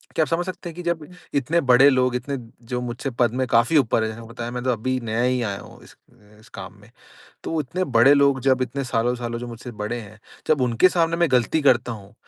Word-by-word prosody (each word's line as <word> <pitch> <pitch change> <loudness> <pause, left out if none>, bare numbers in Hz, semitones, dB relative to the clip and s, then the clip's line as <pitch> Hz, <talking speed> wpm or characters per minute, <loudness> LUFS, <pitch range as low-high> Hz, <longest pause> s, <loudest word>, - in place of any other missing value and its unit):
क्या 160 - +3
आप - - -3
समझ 170 +1 0
सकते 185 -1 -6
हैं 165 - -11
कि 180 - -7
जब 170 -3 -2 0.3
इतने 150 +5 +1
बड़े 130 +3 +7
लोग 130 -2 +1
इतने 135 +3 -3 0.3
जो 125 0 -3
मुझसे 125 +3 -4
पद 120 -2 +3
में 130 0 0
काफ़ी 120 +6 +3
ऊपर 115 -5 +2
है, 110 - -1
जैसे 110 +1 -8
बताया 120 0 -6
मैं 125 0 -5
तो 130 - +1
अभी 130 +3 -1
नया 115 +1 -1
ही 125 0 +1
आया 100 -4 -3
हूँ - - -14
इस - - -17 0.4
इस 110 0 -19
काम - - -8
में। 105 - -18 0.6
तो 160 - -1
इतने 175 +6 -2
बड़े 130 -1 +5
लोग 140 -2 +3
जब 130 -1 +2
इतने 135 +2 -3
सालों-सालों 120 -1 -1
जब 120 - -6
मुझसे 120 +1 -8
बड़े 105 +3 -3
हैं 110 0 -13 0.3
जब 155 -3 +3
उनके 120 +8 +4
सामने 165 -2 +1
मैं 170 0 +2
गलती 125 +5 +2
करता 125 -3 +3
हूँ 100 -2 -11
125 Hz, 240 wpm, -23 LUFS, 115-140 Hz, 0.6 s, बड़े